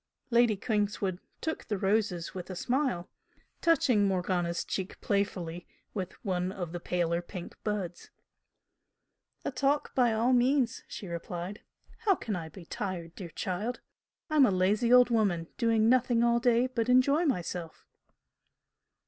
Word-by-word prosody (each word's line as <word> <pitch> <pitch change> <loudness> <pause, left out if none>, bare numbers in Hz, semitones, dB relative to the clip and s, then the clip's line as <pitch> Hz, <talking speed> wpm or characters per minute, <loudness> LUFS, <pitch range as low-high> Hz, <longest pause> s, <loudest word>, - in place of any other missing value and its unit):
Lady 235 -2 +5
Kingswood 205 -3 -1 0.2
took 320 - -3
the 210 - -2
roses 195 -3 0
with 180 -1 -7
a 185 - -5
smile, 245 -4 0 0.5
touching 250 - +4
Morgana's 180 -2 0
cheek 190 0 -4
playfully 180 -4 -2 0.3
with 190 -4 -4
one 180 -1 0
of 175 -4 -5
the 175 - -4
paler 170 -1 0
pink 175 0 -8
buds. 195 -5 -3 1.4
"A - - -1
talk 275 +3 0
by 245 -3 +3
all 230 +3 +2
means!" 250 0 +2
she 205 - -7
replied 175 +3 -5 0.4
"How 430 -4 +3
can 220 - -4
I 165 -2 -5
be 170 +2 -12
tired, 175 -3 -4
dear 180 -3 -8
child? 200 +9 -3 0.5
I'm 300 -4 +5
a - - +3
lazy 200 +5 +2
old 250 -1 +7
woman, 190 -8 +1
doing 225 -2 +3
nothing 245 -1 +3
all 235 0 +4
day 240 0 +3
but 250 -2 -1
enjoy 280 +6 +4
myself!" 175 - -3
205 Hz, 140 wpm, -30 LUFS, 180-245 Hz, 1.4 s, old